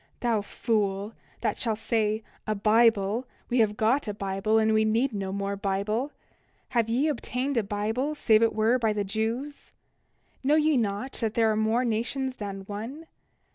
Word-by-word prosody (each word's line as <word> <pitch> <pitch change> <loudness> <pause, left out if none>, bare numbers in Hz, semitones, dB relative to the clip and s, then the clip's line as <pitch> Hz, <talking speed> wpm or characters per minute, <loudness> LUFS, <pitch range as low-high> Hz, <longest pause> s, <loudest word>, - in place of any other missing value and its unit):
29:6 - - -40
Thou 230 -3 +1
fool, 205 -1 -1 0.3
that - - 0
shall 225 -3 0
say: 220 0 0 0.2
A 215 - 0
Bible, 220 +2 +3 0.2
we 245 - +3
have 210 -2 +2
got 235 +4 +2
a 205 - -3
Bible, 195 +2 0
and 220 0 +3
we 220 0 +4
need 230 +4 +1
no 195 -2 -3
more 200 0 -2
Bible. 200 +7 -1 0.6
Have 235 -3 +1
ye 255 +7 +2
obtained 270 -1 -2
a 230 - +3
Bible 220 +8 -2
save 220 -6 +4
it 230 - +2
were 225 +4 +3
by 220 -2 +1
the 205 -1 -1
Jews? 225 +8 -3 0.7
29:7 - - -14
Know 290 +3 +4
ye 310 -1 +3
not 215 +3 -1
that 225 -1 -1
there 225 -1 +3
are - - 0
more 220 +3 +1
nations 255 +3 -1
than 200 -2 -5
one? 225 +11 -7
220 Hz, 180 wpm, -27 LUFS, 210-245 Hz, 0.7 s, we